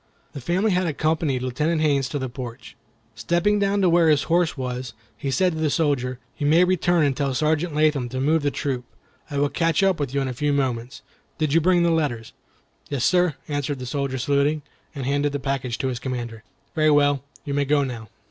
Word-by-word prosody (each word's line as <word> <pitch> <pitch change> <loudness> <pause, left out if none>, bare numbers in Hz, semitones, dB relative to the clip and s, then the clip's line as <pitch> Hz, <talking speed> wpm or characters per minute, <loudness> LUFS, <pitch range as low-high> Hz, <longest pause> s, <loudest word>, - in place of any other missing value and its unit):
The 140 - -7
family 185 - +1
had 180 -1 +1
accompanied 155 -4 0
Lieutenant 150 +6 0
Haines 140 -4 +2
to 145 - -3
the 130 -2 -3
porch. 120 -2 -8 0.4
Stepping 175 - +1
down 200 0 +1
to - - +5
where 170 -1 +4
his 150 -2 +3
horse 170 -1 +1
was, 125 -1 -4 0.2
he 125 +6 -4
said 180 +7 +2
to 160 - -5
the 155 -1 +1
soldier, 140 -5 0 0.2
"You 145 - 0
may 165 +4 +5
return 175 -2 +2
and 140 -2 +1
tell 135 -2 -1
Sergeant 155 +3 0
Latham 150 -5 +2
to 130 +1 -4
move 155 +4 +2
the 145 - +1
troop. 135 -3 -3 0.5
I 145 - -4
will 145 0 +2
catch 165 +3 +1
up 190 -4 +2
with 140 -3 -2
you 140 - 0
in 135 - -1
a 130 - -3
few 145 +4 0
moments. 130 -2 -2 0.3
Did 155 -2 0
you 165 - +4
bring 175 +1 +3
the 170 - +3
letters?" 140 -9 -1 0.6
"Yes, 135 -3 -1
sir," 180 -4 +3
answered 145 -1 -2
the 130 - -6
soldier, 135 +1 -2
saluting, 145 +3 +1 0.3
and 135 -2 -4
handing 145 +2 +1
the 145 - -1
package 130 -3 -2
to 130 - -1
his 125 -2 -3
commander. 120 -4 -5 0.3
"Very 155 -2 +3
well, 145 -2 +3 0.2
you 140 - -3
may 140 0 +1
go 145 +1 +2
now." 115 -5 -6
145 Hz, 215 wpm, -23 LUFS, 130-160 Hz, 0.6 s, to